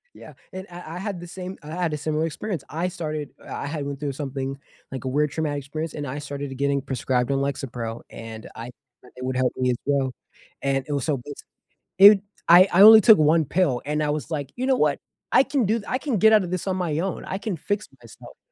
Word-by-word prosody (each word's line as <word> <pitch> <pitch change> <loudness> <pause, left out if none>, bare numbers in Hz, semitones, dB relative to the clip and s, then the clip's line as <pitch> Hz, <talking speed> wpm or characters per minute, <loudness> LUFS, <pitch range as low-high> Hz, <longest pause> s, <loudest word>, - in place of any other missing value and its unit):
Yeah, - - -12 0.2
and 190 0 -6
I 175 -1 -9
I - - -5
had 195 -1 -4
the 175 - -9
same 185 +1 -7
I 150 - -13
had 170 0 -2
a - - -1
similar 155 +1 -1
experience. 170 0 -4
I 165 +4 -2
started 155 -5 -4 0.2
I - - -5
had 145 -1 -4
went 140 -1 -5
through 145 -2 -3
something, 135 -1 -4 0.3
like, 130 -2 -6
a - - -2
weird 150 +3 +1
traumatic 150 -2 -2
experience, 155 +3 -5
and 145 -1 -5
I 130 +3 -5
started 140 -2 -6
getting 140 0 +1
prescribed 125 -2 -1
on 135 - +1
Lexapro, 125 -4 -3
and 110 -1 -9
I 115 +1 -7 0.4
thought 125 - -18
it 125 - -8
would 130 0 -2
help 130 0 +1
me 130 0 +1
as 120 - -2
well, 140 -2 +1 0.5
and 135 -1 0
it 150 - -5
was 140 -2 -1
so, 145 -5 -1 0.8
it 200 0 +9 0.3
I 180 +3 +8
I 185 - +5
only 220 +1 +10
took 220 0 +8
1 155 +2 +4
pill, 145 -6 +1
and 150 +1 -1
I 150 - 0
was 150 +2 -4
like, 145 -3 -4
"You 255 +2 -2
know 260 -1 +3
what, - - +2 0.3
I 260 - +7
can 270 -4 0
do 220 +2 0
I 255 - 0
can 270 -2 -2
get 220 +3 +5
out 215 -2 +5
of 175 - -7
this 185 -2 -3
on 185 -1 0
my 160 -4 -1
own, 190 +2 -3
I 190 - -3
can 200 -3 -4
fix 205 +7 -3
myself - - -14
150 Hz, 240 wpm, -24 LUFS, 135-185 Hz, 0.8 s, only